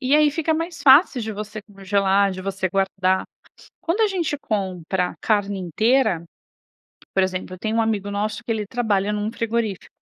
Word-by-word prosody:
e 265 +1 +2
aí 300 -1 +5
fica 320 +2 0
mais 330 +1 -4
fácil 275 -1 +6
de 220 - -4
você 210 +1 -6
congelar, 195 -1 +1
de 185 - -6
você 190 -1 -2
guardar. 190 0 +1 0.6
Quando 355 +6 0
a 435 - +5
gente 340 -7 -1
compra 185 - -2
a - - -15
carne 205 -2 0
inteira, 200 - +2 0.9
por 190 - +3
exemplo, 185 0 -3
eu - - -17
tenho 220 +1 -1
um - - +4
amigo 205 -3 -1
nosso 215 +2 -2
que 235 - -3
ele 215 -2 -1
trabalha 210 -3 0
num 210 +1 -2
frigorífico 230 -4 -2
210 Hz, 180 wpm, -22 LUFS, 195-240 Hz, 0.9 s, fácil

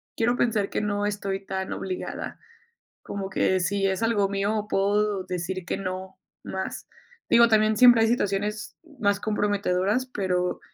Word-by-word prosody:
quiero 240 +2 +1
pensar 215 -4 +1
que - - -1
no 205 -1 -1
estoy 200 -1 -3
tan 190 -1 -4
obligada. 185 -1 -5 0.6
Como 195 -1 -5
que 190 0 +1
si 195 +1 0
es 190 +2 -1
algo 210 -4 +2
mío, 205 +2 -1
puedo 205 -1 +1
decir 185 0 -4
que - - -2
no, 190 0 -5 0.3
más. 190 0 -5 0.4
Digo, 235 0 +7
también 215 0 +3
siempre 245 -1 +7
hay - - +3
situaciones, 210 -2 -1 0.2
más 200 -1 +2
comprometedoras, 205 +1 0
pero 180 -6 -1
200 Hz, 145 wpm, -25 LUFS, 190-210 Hz, 0.6 s, Digo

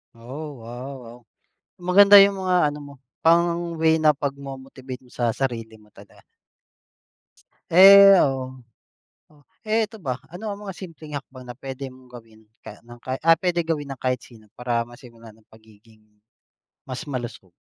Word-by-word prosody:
Oh, 130 +2 -9
wow, 120 +3 -8
wow. 115 +1 -12 0.6
Maganda 200 +3 +6
yung 195 0 +2
mga 180 -5 +1
ano 150 - -9
mo, 145 -1 -11 0.3
pang-way 170 -1 +2
na 155 -1 +3
pagmo-motivate 135 -2 -7
mo 125 - -22
sa 120 -2 -1
sarili 115 -4 -4
mo 105 -1 -22
talaga. - - -18 1.5
Eh, 195 +3 +9
oo. 130 -2 -4 0.7
O, - - -23 0.3
eh, 220 0 0
ito 220 - -15
ba, 130 -2 -3
ano 205 +5 -7
ang 200 - -8
mga 195 - -7
simpleng 160 -5 -10
hakbang 130 -2 -10
na 120 - -9
puwede 135 +1 -8
mong 130 -1 -16
gawin 115 -2 -15 0.2
ka - - -13
ng 120 0 -14
ka 130 +2 -5
ah, 165 -1 +5
puwede 175 -2 -1
gawin 155 -3 -3
ng 135 -2 -9
kahit 125 -1 0
sino 110 -4 -18
para 120 -1 -2
masimulan 115 -1 -15
ang 110 0 -26
pagiging 110 0 -22 0.8
mas 130 -1 -7
malusog? 120 -7 -7
135 Hz, 155 wpm, -23 LUFS, 120-165 Hz, 1.5 s, Eh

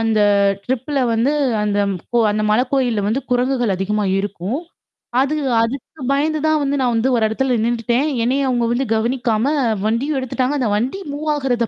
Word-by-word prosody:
அந்த 225 -1 +1 0.4
ட்ரிப்ல 260 +3 -2
வந்து, 230 +5 +2 0.3
அந்த 205 -1 0 0.4
கோ - - +5
அந்த 215 +1 -1
மலைக்கோயில்ல 245 -1 +1
வந்து 225 +6 0
குரங்குகள் 245 -4 +1
அதிகமா 210 +2 -1
இருக்கும். 200 - -3 0.6
அது 285 +3 0 0.3
அதுக்கு 270 +5 -5
பயந்து 305 +3 +1
தான் 310 0 +3
வந்து, 280 0 0
நான் 245 -2 +1
வந்து 225 +3 +1
ஒரு 230 - +1
இடத்துல 250 +2 0
நின்னுட்டேன். 240 +4 0 0.2
என்னைய 270 +3 +1
அவங்க 240 -2 +1
வந்து 255 +3 0
கவனிக்காம, 235 0 0 0.4
வண்டியும் 265 +7 0
எடுத்துட்டாங்க. 260 +2 -1
அந்த 240 -5 0
வண்டி 255 - -2
மூவ் 305 +2 -3
ஆகுறத 245 -5 0
245 Hz, 160 wpm, -19 LUFS, 225-270 Hz, 0.6 s, கோ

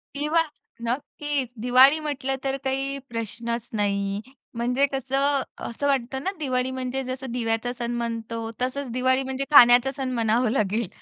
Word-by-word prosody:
दिवा 300 +3 +2 0.4
नक्कीच 280 +1 -2
दिवाळी 260 +5 +6
म्हटलं 275 -3 -2
तर 270 0 -1
काही 270 +1 -1
प्रश्नच 230 +1 -4
नाही. 200 -1 0 0.4
म्हणजे 250 +4 +2
कसं, 270 +1 +1 0.3
असं 285 +5 -3
वाटतं 265 0 -1
ना, 385 - 0
दिवाळी 255 -3 0
म्हणजे 260 +1 -3
जसं 255 0 -5
दिव्याचा 235 0 -1
सण 240 0 -2
म्हणतो. 230 -1 -4
तसंच 260 +1 -2
दिवाळी 260 +2 +2
म्हणजे 265 +1 -3
खाण्याचा 245 -1 +8
सण 265 -2 -2
म्हणावा 230 0 +2
लागेल. 215 -2 0
255 Hz, 140 wpm, -25 LUFS, 235-270 Hz, 0.4 s, खाण्याचा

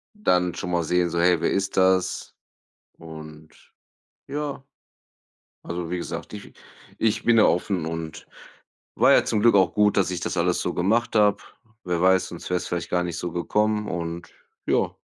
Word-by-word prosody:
dann 90 - +1
schon 90 - -5
mal 85 -1 +1
sehen, 90 +2 +1
so: 85 - -1
„Hey, 90 0 +4
wer - - 0
ist 100 0 -2
das?“ 95 -1 +1 0.7
Und, 80 -1 -11 0.8
ja, 145 -2 -4 1.0
also, 85 -1 -5
wie 90 - -2
gesagt, 85 - -6
ich 105 -1 -10 0.5
ich 110 -1 0
bin 120 -1 +4
ja 110 - +6
offen 90 0 +1
und 80 -1 -6 0.7
war - - +5
ja - - +5
zum 105 - 0
Glück 115 -1 +5
auch 95 -3 +3
gut, 105 -1 +3
dass 95 -2 +2
ich 90 - -3
das - - -3
alles 90 +1 +1
so 90 - -2
gemacht 110 +6 +1
habe. 105 -1 +3 0.4
Wer 90 -2 -1
weiß, 95 0 +3
sonst 85 - -8
wär's 90 -1 -1
vielleicht 85 -1 -4
gar 90 - +1
nicht 85 -1 -4
so 90 -1 -4
gekommen 105 +4 0
und 85 0 -5 0.4
ja. - - +1
90 Hz, 175 wpm, -24 LUFS, 85-105 Hz, 1.0 s, ja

